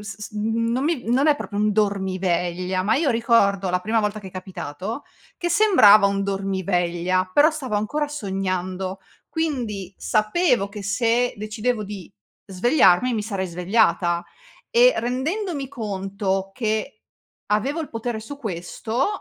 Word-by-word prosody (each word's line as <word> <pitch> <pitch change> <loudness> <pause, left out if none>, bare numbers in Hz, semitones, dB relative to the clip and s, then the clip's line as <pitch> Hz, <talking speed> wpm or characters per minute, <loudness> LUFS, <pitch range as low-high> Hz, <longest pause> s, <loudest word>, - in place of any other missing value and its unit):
s 210 -1 -8
s 210 - -7
non 230 +4 -1
mi 315 -5 -1
non 265 +5 +3
è 295 - +4
proprio 205 -6 -4
un 210 0 +2
dormiveglia, 185 -3 0
ma 215 +4 +2
io 285 -2 +2
ricordo, 200 -5 +2
la 180 - +1
prima 220 +4 +1
volta 210 0 -1
che 195 - -10
è - - -8
capitato, 185 - -6 0.3
che 345 - -1
sembrava 215 - +6
un 200 0 0
dormiveglia, 185 -2 -1
però 290 - +6
stavo 260 -9 -3
ancora 290 +9 -1
sognando, 190 -6 -3 0.3
quindi 235 - -3
sapevo 215 - +1
che 200 0 -8
se 230 +4 +1
decidevo 215 +2 -2
di 195 -3 -9 0.3
svegliarmi 205 - +3
e - - 0
mi 215 - -1
sarei 195 -3 -3
svegliata, 175 -1 +1 0.4
e - - +6
rendendomi 280 - -2
conto 195 -4 -3
che 215 -1 -2 0.5
avevo 245 +10 0
il 315 - -5
potere 225 0 -4
su 280 +6 -8
questo, 220 +3 -3
210 Hz, 145 wpm, -23 LUFS, 190-245 Hz, 0.5 s, sembrava